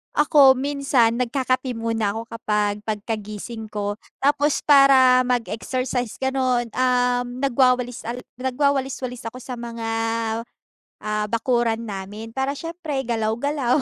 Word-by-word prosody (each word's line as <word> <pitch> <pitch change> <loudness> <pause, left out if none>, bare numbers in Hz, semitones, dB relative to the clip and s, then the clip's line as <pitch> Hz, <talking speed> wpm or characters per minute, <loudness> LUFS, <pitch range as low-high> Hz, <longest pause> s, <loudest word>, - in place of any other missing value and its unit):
Ako, 290 -3 +6
minsan 270 -4 +1
nagkakape 255 +1 -1
muna 225 -3 -1
ako 225 +1 -6
kapag, 210 -2 -1
pagkagising 215 +1 -5
ko, 205 -1 -4 0.2
tapos 290 +1 +2
para 265 -3 +6
mag-exercise 250 0 -2
gano'n, 255 -3 0
um, 250 +1 0
nagwawalis 250 -2 +1
al 240 +2 -4 0.2
nagwawalis-walis 260 -2 -1
ako 250 +3 -7
sa 250 0 -7
mga, 230 -1 -5 1.1
ah, 210 0 -1
bakuran 230 0 0
namin, 205 +3 -7
para 265 +1 -1
siyempre 330 -4 -4
galaw-galaw, 240 +4 0
245 Hz, 110 wpm, -23 LUFS, 225-265 Hz, 1.1 s, Ako